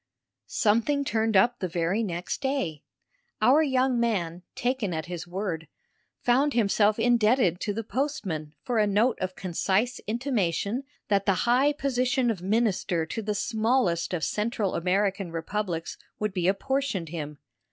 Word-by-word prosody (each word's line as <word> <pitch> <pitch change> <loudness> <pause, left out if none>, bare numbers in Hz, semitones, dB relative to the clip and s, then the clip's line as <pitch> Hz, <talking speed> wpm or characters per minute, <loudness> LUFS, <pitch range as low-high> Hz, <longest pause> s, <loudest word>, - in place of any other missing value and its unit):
Something 235 +7 +2
turned 225 -6 +1
up 240 +5 +3
the 185 - -1
very 175 +5 0
next 180 0 -3
day: 265 - -1 0.6
our 280 +5 +5
young 260 -4 +2
man, 180 -7 -1
taken 245 -8 -1
at 160 - -3
his 175 -1 -6
word, 175 -3 -4 0.6
found 265 +3 +3
himself 210 -1 +3
indebted 230 -6 +3
to 205 - -2
the 225 +3 -3
postman 195 - -3
for 240 -3 0
a 210 - +3
note 215 +5 +2
of 185 0 -2
concise 195 +6 0
intimation 230 - -1 0.2
that 200 -1 +2
the 195 - +4
high 255 +5 +4
position 255 -3 +1
of 195 -6 -5
minister 190 -5 +1
to 225 +8 -4
the 210 0 -2
smallest 220 -6 +1
of 175 -4 -2
Central 210 -2 -1
American 195 +1 0
republics 165 0 -3 0.2
would 210 -2 -2
be 180 -2 0
apportioned 240 - 0
him. 150 -3 -6
210 Hz, 145 wpm, -27 LUFS, 180-245 Hz, 0.6 s, our